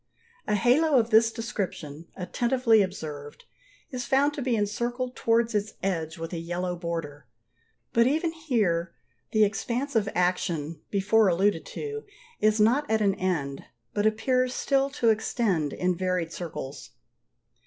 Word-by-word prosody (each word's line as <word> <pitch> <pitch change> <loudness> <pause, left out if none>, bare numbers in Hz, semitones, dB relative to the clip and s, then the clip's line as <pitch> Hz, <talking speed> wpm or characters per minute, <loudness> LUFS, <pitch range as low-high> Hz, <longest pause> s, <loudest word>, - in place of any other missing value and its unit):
A 210 - +2
halo 265 +7 +4
of 235 -1 +2
this 225 +1 +5
description, 170 -9 -5
attentively 235 +4 +2
observed, 150 -6 -5 0.5
is 250 -2 -3
found 280 +2 +3
to 290 - -5
be 250 -2 +1
encircled 240 +4 -2
towards 230 0 +2
its 210 0 -1
edge 165 -3 -2
with 165 +1 -6
a 170 - -2
yellow 175 +2 -3
border: 165 -4 -5 0.7
but 235 +1 +5
even 320 +4 +1
here 210 - 0 0.4
the 215 -1 +4
expansive 225 +2 0
action, 170 -4 0
before 210 +2 +3
alluded 185 0 +1
to, 435 0 -5 0.4
is 215 0 +3
not 250 +8 +3
at 220 0 +2
an 200 -2 +3
end, 160 -8 -2 0.3
but 205 +1 +2
appears 255 +3 +1
still 275 0 +1
to 245 -4 +1
extend 205 - +1
in 180 0 0
varied 180 -2 -1
circles. 155 -5 -7
210 Hz, 140 wpm, -27 LUFS, 175-240 Hz, 0.7 s, this